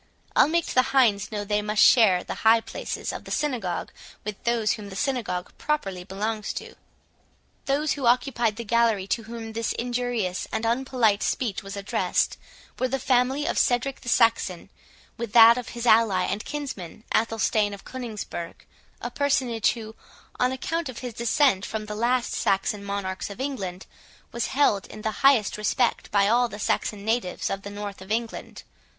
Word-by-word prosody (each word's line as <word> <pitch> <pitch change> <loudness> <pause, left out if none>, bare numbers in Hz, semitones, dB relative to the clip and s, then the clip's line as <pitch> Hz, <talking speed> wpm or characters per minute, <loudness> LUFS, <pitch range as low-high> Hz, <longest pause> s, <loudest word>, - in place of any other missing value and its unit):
I'll - - +6
make 335 +2 +1
the 255 - +3 0.2
hinds 210 -6 +3
know 205 -1 -3
they 210 0 +1
must 210 0 +3
share 200 -8 +6
the - - -5
high 225 +1 +6
places - - -5
of - - -6
the - - -9
synagogue 240 - -2 0.3
with 210 -1 -6
those 235 -3 +2
whom 210 -3 -4
the 190 - -9
synagogue 225 -7 -2
properly 195 -12 -2
belongs 210 +3 -3
to." - - -7 0.9
Those 285 +2 +1
who 270 -4 -1
occupied 240 -3 +2
the 235 - -5
gallery 230 -3 +2
to 230 +3 -1
whom 225 -1 -7
this 230 0 -1
injurious 240 -6 -2
and 220 +1 -2
unpolite 235 -3 +2
speech 220 -5 -1
was 195 0 -8
addressed, 200 0 0 0.4
were 255 - +2
the 270 +1 -1
family 260 +2 +1
of - - 0
Cedric 250 +2 +1
the 245 - -5
Saxon, 225 -7 +2 0.5
with 230 -2 -5
that 230 -1 +9
of 250 -1 -5
his 235 - -3
ally 220 -5 +4
and 205 - -2
kinsman, 240 - -6
Athelstane 220 -2 +1
of 200 -1 -10
Coningsburgh, 220 -9 -6 0.4
a - - -4
personage, 260 -6 +1
who, 220 -2 -9 0.4
on 250 0 +3
account 320 +4 -2
of 250 - -8
his 245 - -5
descent 235 -2 +2
from 215 0 -4
the 210 - -6
last 240 +3 0
Saxon 195 +1 0
monarchs 200 -1 -3
of 200 - -9
England, 195 -10 -4 0.5
was 235 -1 -2
held 235 -8 +2
in 215 - -10
the 220 - 0
highest 255 -7 +4
respect 235 +3 0
by 200 -1 +3
all 240 +3 +3
the 205 - -8
Saxon 205 0 -1
natives 225 -5 -1
of 195 - -3
the 200 - -7
north 205 -1 -7
of 190 +2 -10
England. 230 +1 -3
225 Hz, 175 wpm, -25 LUFS, 205-250 Hz, 0.9 s, that